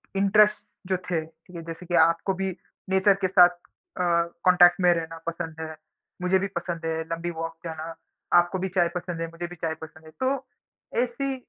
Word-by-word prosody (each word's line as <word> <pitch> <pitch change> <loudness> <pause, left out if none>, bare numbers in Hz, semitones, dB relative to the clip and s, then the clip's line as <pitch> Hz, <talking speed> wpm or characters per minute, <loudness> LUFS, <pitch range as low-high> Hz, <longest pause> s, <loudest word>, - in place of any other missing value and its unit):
interest 210 +2 +4 0.3
जो 185 - +1
थे 180 -2 -2
ठीक 165 +3 -19
है, 170 - -5
जैसे 165 +2 -8
कि 175 0 -1
आपको 165 +3 +1
भी 190 0 -2 0.4
नेचर 190 +1 +4
के - - +4
साथ 180 -1 +7
अ, 180 - -12 0.4
कॉन्टैक्ट 180 0 +6
में 180 -1 +6
रहना 165 -1 -4
पसंद 165 -1 -4
है, 160 0 -5 0.5
मुझे 180 +1 +3
भी 195 - -1
पसंद 170 -1 -4
है 160 0 -1
लंबी 165 +1 -2
वॉक 165 0 -4
जाना, 165 0 -6 0.4
आपको 175 +2 +4
भी 190 - -1
चाय 175 -2 +4
पसंद 175 -1 -4
है, 165 - -2
मुझे 170 +1 -5
भी 175 - -10
चाय 165 -1 -2
पसंद 160 0 -11
है 155 - -13
तो 265 0 0 0.6
ऐसी 270 +2 -3
175 Hz, 195 wpm, -26 LUFS, 165-190 Hz, 0.6 s, साथ